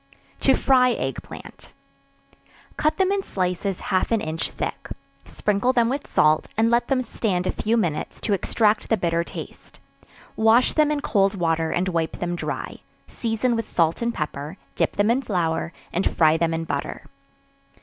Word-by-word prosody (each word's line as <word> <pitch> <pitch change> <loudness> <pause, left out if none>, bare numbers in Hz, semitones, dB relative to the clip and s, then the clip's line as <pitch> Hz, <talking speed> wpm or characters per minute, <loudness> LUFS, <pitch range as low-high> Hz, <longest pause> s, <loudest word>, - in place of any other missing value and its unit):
To - - +4
Fry 250 -2 +4
Egg - - -3
Plant. - - -12 1.0
Cut 305 - +1
them 380 0 +2
in 400 0 +1
slices 185 - -2
half 185 - +1
an 225 - +3
inch 160 -2 -3
thick; - - -5 0.4
sprinkle 210 +5 0
them 235 -2 +3
with 280 +3 -3
salt, 155 0 +3
and 225 +1 +3
let 240 +1 +2
them 260 -2 +1
stand 195 -6 -1
a - - +1
few 225 +2 0
minutes 170 -9 -2
to 210 - 0
extract 210 +2 +1
the 225 - +3
bitter 170 -2 0
taste; - - -10 0.6
wash 225 +3 +4
them 305 -1 +3
in 300 -1 -1
cold 200 -7 +2
water, 165 -3 0
and 180 +3 0
wipe 165 -3 -1
them 175 0 -2
dry; - - -5 0.3
season 230 +1 -1
with 230 -1 -3
salt 165 +2 +1
and 235 0 +1
pepper; 150 +3 -4 0.2
dip - - 0
them 205 +2 +3
in 255 +3 +2
flour, 170 -7 -1 0.2
and 180 +3 +1
fry 155 -1 +4
them 165 0 +1
in 165 0 -2
butter. - - -4
200 Hz, 170 wpm, -23 LUFS, 170-235 Hz, 1.0 s, To